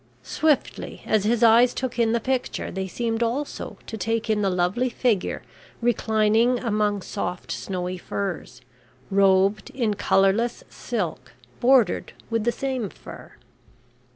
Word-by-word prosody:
Swiftly 310 Hz, -3 st, -1 dB
as 215 Hz, -2 st, +1 dB
his 235 Hz, +2 st, +2 dB
eyes 235 Hz, +2 st, +6 dB
took 250 Hz, -2 st, -3 dB
in 230 Hz, -1 st, +3 dB
the 235 Hz, -, +2 dB
picture, 255 Hz, +2 st, -2 dB
they 190 Hz, +1 st, -3 dB
seemed 230 Hz, +3 st, -2 dB
also 250 Hz, +5 st, -3 dB
to -, -, -6 dB
take 225 Hz, +2 st, -1 dB
in 210 Hz, -1 st, +1 dB
the 195 Hz, -, +2 dB
lovely 185 Hz, +8 st, +1 dB
figure 235 Hz, -5 st, 0 dB, 0.4 s
reclining 225 Hz, 0 st, +2 dB
among 210 Hz, -4 st, 0 dB
soft 180 Hz, -, -4 dB
snowy 180 Hz, -1 st, -4 dB
furs, 200 Hz, +2 st, -5 dB, 0.5 s
robed 195 Hz, +1 st, +3 dB
in 230 Hz, -5 st, -1 dB
colourless 200 Hz, +4 st, +2 dB
silk 180 Hz, -, -4 dB, 0.3 s
bordered 245 Hz, -6 st, +3 dB, 0.2 s
with 225 Hz, -1 st, 0 dB
the 240 Hz, -, +3 dB
same 255 Hz, -4 st, -3 dB
fur. -, -, -12 dB
220 Hz, 130 wpm, -24 LUFS, 195-240 Hz, 0.5 s, eyes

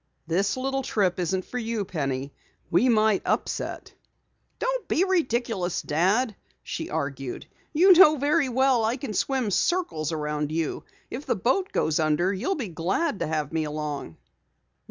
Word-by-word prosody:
"This 190 Hz, +7 st, 0 dB
little 270 Hz, +1 st, -1 dB
trip 195 Hz, -8 st, 0 dB
isn't 185 Hz, +1 st, -1 dB
for 250 Hz, -, -4 dB
you, 225 Hz, -3 st, -2 dB
Penny. 140 Hz, -5 st, -3 dB, 0.4 s
We 230 Hz, +10 st, +4 dB
might 215 Hz, -3 st, +3 dB
upset." -, -, -2 dB, 0.6 s
"Don't -, -, -2 dB
be 350 Hz, -, +2 dB
ridiculous, 235 Hz, -, 0 dB
Dad," 195 Hz, -, +1 dB, 0.3 s
she 160 Hz, -, -5 dB
argued. 140 Hz, -4 st, -4 dB, 0.3 s
"You 365 Hz, +5 st, +7 dB
know 320 Hz, -4 st, +7 dB
very 290 Hz, +1 st, +2 dB
well 260 Hz, -1 st, +3 dB
I 225 Hz, +4 st, 0 dB
can 255 Hz, -5 st, -5 dB
swim 255 Hz, 0 st, 0 dB
circles 185 Hz, -, 0 dB
around 150 Hz, -1 st, -2 dB
you. 160 Hz, -1 st, -2 dB, 0.3 s
If 265 Hz, +5 st, -6 dB
the -, -, +2 dB
boat 265 Hz, -, 0 dB
does 155 Hz, -1 st, +1 dB
go -, -, +3 dB
under, 155 Hz, +5 st, +1 dB
you'll 290 Hz, -, -1 dB
be 245 Hz, -10 st, -4 dB
glad 190 Hz, -, -1 dB
to -, -, -1 dB
have 155 Hz, -1 st, -2 dB
me 160 Hz, -1 st, 0 dB
along." 150 Hz, -, -5 dB
200 Hz, 155 wpm, -26 LUFS, 160-265 Hz, 0.6 s, You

